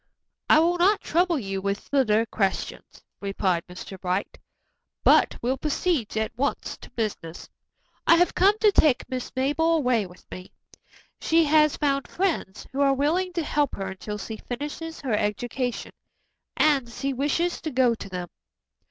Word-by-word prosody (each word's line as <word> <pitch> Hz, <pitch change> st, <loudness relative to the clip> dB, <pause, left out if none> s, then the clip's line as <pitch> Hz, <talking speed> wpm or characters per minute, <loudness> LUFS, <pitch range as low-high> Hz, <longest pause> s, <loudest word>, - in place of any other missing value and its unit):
"I -, -, +7 dB
will 345 Hz, +3 st, +3 dB
not 395 Hz, +4 st, +4 dB
trouble 345 Hz, 0 st, +1 dB
you 195 Hz, -6 st, -4 dB
with 200 Hz, +1 st, -1 dB
further 230 Hz, -5 st, +2 dB
questions," 195 Hz, -4 st, -3 dB, 0.2 s
replied 190 Hz, -3 st, -1 dB
Mr. 185 Hz, +1 st, -9 dB
Bright, 185 Hz, +2 st, -2 dB, 0.6 s
"but -, -, +4 dB
will 255 Hz, +3 st, 0 dB
proceed 300 Hz, -, -1 dB
at 220 Hz, 0 st, -2 dB
once 280 Hz, +4 st, -2 dB
to -, -, -13 dB
business. 210 Hz, -8 st, -5 dB, 0.6 s
I 335 Hz, -, +8 dB
have 355 Hz, +1 st, +3 dB
come 400 Hz, +3 st, +4 dB
to 425 Hz, -2 st, +6 dB
take 295 Hz, -9 st, +3 dB
Miss 255 Hz, -1 st, -4 dB
Mabel 295 Hz, +5 st, +2 dB
away 250 Hz, -, +1 dB
with 180 Hz, 0 st, -17 dB
me. 185 Hz, 0 st, -9 dB, 0.7 s
She 330 Hz, +1 st, +3 dB
has 305 Hz, -1 st, +4 dB
found 275 Hz, -2 st, 0 dB
friends 335 Hz, -, -2 dB
who 270 Hz, +2 st, -2 dB
are 275 Hz, -1 st, +4 dB
willing 335 Hz, +7 st, 0 dB
to 340 Hz, -2 st, -1 dB
help 295 Hz, -2 st, 0 dB
her 195 Hz, -1 st, -4 dB
until 210 Hz, +2 st, -6 dB
she 220 Hz, +2 st, -6 dB
finishes 295 Hz, +7 st, -6 dB
her 260 Hz, -6 st, -2 dB
education, 240 Hz, +4 st, -2 dB, 0.7 s
and 280 Hz, -6 st, +3 dB
she 275 Hz, +4 st, -3 dB
wishes 295 Hz, +6 st, 0 dB
to 315 Hz, -, -3 dB
go 255 Hz, -3 st, +3 dB
to 210 Hz, -3 st, -8 dB
them." 180 Hz, -2 st, -5 dB
265 Hz, 160 wpm, -25 LUFS, 210-315 Hz, 0.7 s, I